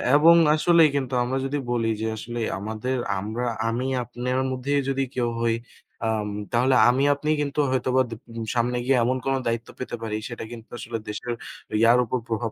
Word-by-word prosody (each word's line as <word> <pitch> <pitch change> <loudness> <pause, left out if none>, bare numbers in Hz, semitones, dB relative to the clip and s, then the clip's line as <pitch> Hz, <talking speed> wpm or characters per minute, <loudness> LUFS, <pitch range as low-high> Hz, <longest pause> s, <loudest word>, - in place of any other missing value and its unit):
এবং 165 +3 +7 0.2
আসলেই 165 0 +5
কিন্তু 130 -2 -1
আমরা 130 +2 -1
যদি 140 +2 -1
বলি 115 -2 +1
যে 110 - 0
আসলেই 115 0 -3
আমাদের 110 +5 -3 0.2
আমরা, 110 +5 -3 0.2
আমি 125 +3 -1 0.2
আপনের 125 +2 -3
মধ্যেই 140 +2 0
যদি 135 0 +1
কেউ 120 -2 +1
হই 115 -1 +2 0.5
আম 110 -2 0 0.3
তাহলে 130 +2 +3
আমি 130 +3 +2
আপনি 145 +2 -4
কিন্তু 145 0 -2
হয়তোবা 130 0 +2
দু 115 - -5 0.2
উম 115 -1 -4
সামনে 120 +1 +1
গিয়ে 135 0 +3
এমন 130 +2 +1
কোন 135 - +1
দায়িত্ব 115 0 -2
পেতে 130 - -4
পারি 110 -2 -2
সেটা 120 -2 -6
কিন্তু 115 -1 -10
আসলে 115 0 -4
দেশের 120 +3 -4 0.5
ইয়ার 120 +2 +6
উপর 125 +3 -1
প্রভাব 115 0 -2
125 Hz, 180 wpm, -25 LUFS, 115-130 Hz, 0.5 s, এবং